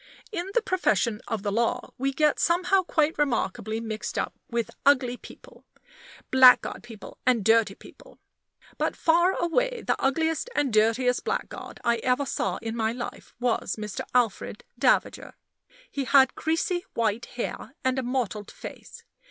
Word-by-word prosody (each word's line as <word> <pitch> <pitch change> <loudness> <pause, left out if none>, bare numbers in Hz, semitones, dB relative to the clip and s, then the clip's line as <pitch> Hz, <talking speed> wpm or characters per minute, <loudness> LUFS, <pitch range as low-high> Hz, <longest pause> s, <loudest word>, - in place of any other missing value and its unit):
In 365 -2 -3
the 480 - +3
profession 295 - +1
of 220 -3 -3
the 205 - -1
law 235 +3 -1
we 270 +1 +1
get 300 +2 +2
somehow 365 +3 +3
quite 315 -3 0
remarkably 225 -5 -1
mixed 220 -2 -5
up - - -1 0.2
with 235 -1 -2
ugly 260 -3 +3
people, - - -15 0.7
blackguard 260 -1 +6
people, 225 -4 -12
and 240 -5 +2
dirty 225 0 +4
people. - - -16 0.6
But - - 0
far 345 +3 +3
away - - 0
the - - +2
ugliest 320 - 0
and 275 -5 +1
dirtiest 230 +4 +2
blackguard - - -4
I 235 0 +2
ever 255 +4 0
saw - - -2
in 225 0 -3
my 220 -1 0
life 240 +1 -7
was 245 -2 0
Mr. 210 -2 -5
Alfred 240 -5 0 0.2
Davager. - - +1 0.6
He 280 -2 -2
had 265 +1 +5
greasy 350 +3 -1
white 230 0 0
hair 260 +3 -5
and 260 0 +1
a - - 0
mottled 240 -5 -2
face. - - -10
250 Hz, 150 wpm, -26 LUFS, 230-310 Hz, 0.7 s, blackguard